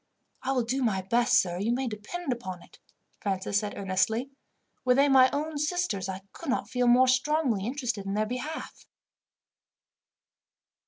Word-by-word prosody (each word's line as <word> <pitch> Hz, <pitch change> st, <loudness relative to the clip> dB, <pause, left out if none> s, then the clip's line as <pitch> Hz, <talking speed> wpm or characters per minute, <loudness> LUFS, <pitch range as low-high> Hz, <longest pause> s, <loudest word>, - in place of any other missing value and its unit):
"I 260 Hz, -, -1 dB
will 250 Hz, -2 st, +1 dB
do 255 Hz, +4 st, -1 dB
my 200 Hz, -6 st, 0 dB
best, 235 Hz, +5 st, +3 dB
sir, 175 Hz, -1 st, -1 dB
you 215 Hz, +4 st, 0 dB
may 255 Hz, +2 st, 0 dB
depend 250 Hz, +8 st, -4 dB
upon 185 Hz, -7 st, -7 dB
it," -, -, -19 dB, 0.4 s
Francis 195 Hz, 0 st, 0 dB
said 210 Hz, -1 st, -5 dB
earnestly. 210 Hz, +7 st, 0 dB, 0.5 s
"Were 250 Hz, -1 st, +4 dB
they 280 Hz, +2 st, +5 dB
my 260 Hz, -2 st, +6 dB
own 300 Hz, +1 st, -2 dB
sisters, 300 Hz, -, -1 dB
I 190 Hz, 0 st, -5 dB
could -, -, -8 dB
not 255 Hz, -, 0 dB
feel 250 Hz, -1 st, +1 dB
more 250 Hz, +2 st, +6 dB
strongly 255 Hz, -5 st, +1 dB
interested 245 Hz, -6 st, -3 dB
in 195 Hz, -, -2 dB
their 215 Hz, +1 st, +1 dB
behalf." 255 Hz, +8 st, -6 dB
245 Hz, 160 wpm, -28 LUFS, 205-270 Hz, 0.5 s, my